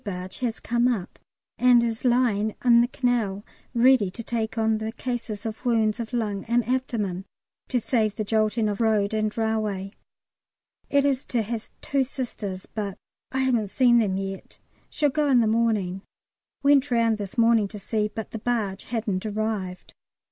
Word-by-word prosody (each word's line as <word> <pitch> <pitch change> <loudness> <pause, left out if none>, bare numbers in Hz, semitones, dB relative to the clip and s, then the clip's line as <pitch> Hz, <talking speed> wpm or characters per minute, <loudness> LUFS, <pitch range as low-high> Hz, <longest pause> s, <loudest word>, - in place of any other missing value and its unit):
barge 185 -2 -6
has 240 -3 -2
come 240 +1 +1
up, 215 -7 -2 0.4
and 245 -1 +6
is 225 -1 -2
lying 235 -4 +2
in 235 -1 +7
the 240 - +2
canal 235 -6 -1 0.3
ready 240 -4 +5
to 230 +5 -8
take 225 0 -3
on 220 -1 +2
the 220 0 -3
cases 235 -4 -4
of 220 +1 -5
wounds 225 -3 +2
of 230 -1 -4
lung 210 -5 -2
and 235 0 +1
abdomen, 225 -8 -1 0.4
to 250 - +1
save 220 -3 0
the 215 - -2
jolting 215 +1 +1
of 205 +1 -2
road 215 -2 +2
and 215 0 -1
railway; 215 -3 -1 1.0
it 280 0 +3
is 275 -1 +1
to 235 -3 -1
have 225 +1 -5
two 275 -1 +1
Sisters, 220 -8 -5
but 205 -3 -5 0.3
I 265 - 0
haven't 240 -5 +1
seen 240 +1 +4
them 195 -4 +1
yet: 195 0 -6 0.3
shall 295 -2 +1
go 300 0 +1
in 255 -3 +5
the 230 - +3
morning: 215 -4 +1 0.6
went 280 0 +4
round 230 -3 +2
this 200 +3 -6
morning 230 -2 +4
to 210 - -9
see, 210 +1 -1
but 220 0 -7
the 225 - -5
barge 210 -5 -2
hadn't 215 -5 -2
arrived. 210 -4 -3
225 Hz, 170 wpm, -25 LUFS, 205-240 Hz, 1.0 s, in